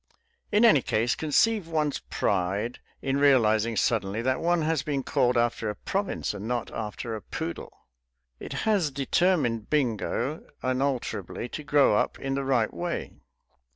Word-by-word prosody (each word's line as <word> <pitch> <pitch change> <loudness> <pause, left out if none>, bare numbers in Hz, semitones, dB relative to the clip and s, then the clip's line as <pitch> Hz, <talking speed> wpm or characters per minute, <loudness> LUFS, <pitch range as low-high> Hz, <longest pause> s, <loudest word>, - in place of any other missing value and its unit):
In 210 +3 +5
any 180 - +6
case 115 +2 +1
conceive 185 +5 +2
one's 155 -3 0
pride 100 +5 -1 0.2
in 135 0 0
realizing 115 -5 +4
suddenly 110 -1 0
that 130 +1 +1
one 175 -1 +1
has 155 -2 +1
been 140 -1 -2
called 125 -1 +2
after 120 -2 +1
a 105 - -4
province 195 - -2
and 105 +1 -6
not 120 -1 -2
after 110 +1 -4
a 110 - -6
poodle. - - -6 0.5
It - - -7
has 200 -8 +2
determined 135 - +1
Bingo 135 +1 -1 0.2
unalterably 130 -2 -2
to 155 - -6
grow 145 -6 +4
up - - 0
in 135 0 -3
the 140 0 -1
right 130 -4 +1
way. 175 -1 -4
130 Hz, 150 wpm, -27 LUFS, 115-155 Hz, 0.5 s, any